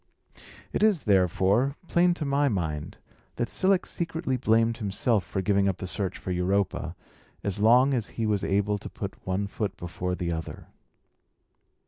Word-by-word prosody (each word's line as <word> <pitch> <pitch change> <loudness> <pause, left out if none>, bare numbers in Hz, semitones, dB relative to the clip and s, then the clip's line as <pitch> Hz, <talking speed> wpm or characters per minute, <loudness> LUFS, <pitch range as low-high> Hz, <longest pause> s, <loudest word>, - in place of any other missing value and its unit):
It - - -1
is, 210 -7 +3
therefore, 100 - +3
plain 175 0 +3
to 155 - -4
my 140 +1 +2
mind, 80 - -3 0.4
that 120 - -2
Cilix 190 -1 +1
secretly 165 -5 -2
blamed 115 -1 +2
himself 105 0 0
for 95 - -3
giving 100 0 +2
up 95 - -2
the - - -5
search 95 0 -3
for 95 - -5
Europa, 95 +2 0 0.5
as 100 0 -1
long 125 +6 +5
as 115 -5 0
he 115 - 0
was 105 -2 0
able 105 +1 +1
to - - -8
put - - -7
one 95 +2 0
foot 100 0 -4
before 90 +1 -3
the 85 -1 -2
other. 80 -1 -6
105 Hz, 160 wpm, -27 LUFS, 95-130 Hz, 0.5 s, long